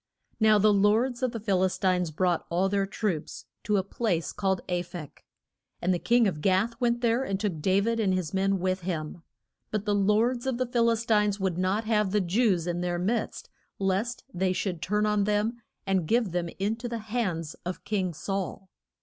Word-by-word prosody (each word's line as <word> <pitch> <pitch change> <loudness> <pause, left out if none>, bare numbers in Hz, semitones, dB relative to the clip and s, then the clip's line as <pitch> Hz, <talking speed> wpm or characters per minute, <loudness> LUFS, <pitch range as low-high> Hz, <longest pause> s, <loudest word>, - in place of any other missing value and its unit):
Now 215 -1 +5
the 210 +1 +4
lords 220 +6 +2
of 255 -2 +1
the 230 - -5
Phil 195 -4 +1
is 185 - 0
tines 180 -3 +1
brought 175 +2 0
all 185 +3 +1
their 195 0 +1
troops 195 -6 -3 0.2
to 210 -2 +2
a 190 - +1
place 190 -4 -1
called 190 -2 0
A 180 -1 0
phek. 170 -4 -9 0.6
And 185 +2 +1
the 175 - -1
king 235 +2 +3
of 155 -6 -3
Gath 195 +6 +2
went 240 0 +1
there, 235 +2 +2
and 195 -7 -2
took 200 -7 -2
Da 190 +4 +3
vid 230 +2 0
and 205 -4 +2
his 185 -3 -1
men 195 +1 +2
with 185 +1 0
him. 170 -2 -4 0.5
But 210 -1 -2
the 205 - +1
lords 220 +5 +2
of 260 -2 0
the 255 - 0
Phil 235 -1 +2
is 230 0 0
tines 210 -3 +2
would 185 -2 -1
not 190 +4 +1
have 210 -2 +1
the 210 +2 +2
Jews 185 -1 +2
in 175 0 -2
their 175 -1 -1
midst 205 +7 -2 0.3
lest 200 +5 -1
they 185 +1 +1
should 180 -3 -3
turn 210 +2 +1
on 210 -1 +2
them 210 +3 0 0.2
and 190 -4 +1
give 230 -2 +2
them 175 -1 -1
in 205 +4 -1
to 240 +1 -5
the 235 - -3 0.2
hands 170 -10 -1
of 180 +1 -5
king 195 -4 -1
Saul. 190 +4 -4
195 Hz, 210 wpm, -27 LUFS, 185-220 Hz, 0.6 s, Now